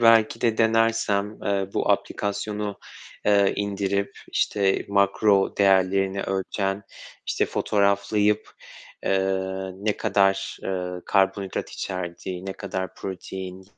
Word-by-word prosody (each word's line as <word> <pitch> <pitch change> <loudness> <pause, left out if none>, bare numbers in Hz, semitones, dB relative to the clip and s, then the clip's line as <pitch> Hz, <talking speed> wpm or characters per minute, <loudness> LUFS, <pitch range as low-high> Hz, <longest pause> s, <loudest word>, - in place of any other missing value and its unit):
belki 115 -2 +5
de 115 -2 +1
denersem, 115 -2 +2
eee, 100 -1 0
bu - - +1
aplikasyonu, 105 0 -1 0.5
eee, 100 -1 +5
indirip, 100 -1 -1 0.2
işte, 100 -2 +1
makro 100 0 +3
değerlerini 95 0 +3
ölçen, 95 +1 -2 0.4
işte, - - +1
fotoğraflayıp, 105 +1 +1 0.5
eee, 95 0 0
ne 105 +2 -1
kadar, 95 -2 +1
eee, 90 -1 -2 0.2
karbonhidrat 95 -1 +1
içerdiği, 90 0 -5
ne 95 - -3
kadar 95 -1 -4
protein 95 0 -7
100 Hz, 100 wpm, -25 LUFS, 95-105 Hz, 0.5 s, belki